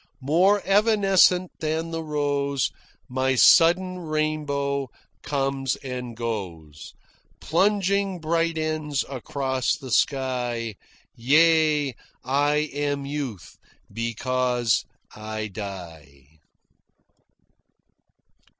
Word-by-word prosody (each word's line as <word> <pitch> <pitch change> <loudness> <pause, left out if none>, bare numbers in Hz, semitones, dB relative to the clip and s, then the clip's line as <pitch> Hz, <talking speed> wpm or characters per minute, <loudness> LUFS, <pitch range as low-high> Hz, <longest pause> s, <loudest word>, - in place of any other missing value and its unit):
More 185 +8 +3
evanescent 195 -3 +4
than 160 +1 -2
the 165 0 -3
rose 140 -3 -1 0.4
My 130 +1 0
sudden 180 +7 +5
rainbow 150 -4 -2 0.3
comes 135 -1 -1
and 125 -3 -7
goes, 90 -10 -6 0.4
Plunging 195 +1 +1
bright 165 +1 0
ends 155 -3 -2
across 130 0 -2
the 130 -4 -9
sky 125 -4 0 0.4
Yea, 150 +2 +3 0.3
I 145 +3 +1 0.2
am 145 -1 -2
Youth 140 - -6 0.4
because 120 +1 0 0.3
I 110 0 -5
die!'" 80 -8 -10
140 Hz, 75 wpm, -24 LUFS, 120-160 Hz, 0.4 s, sudden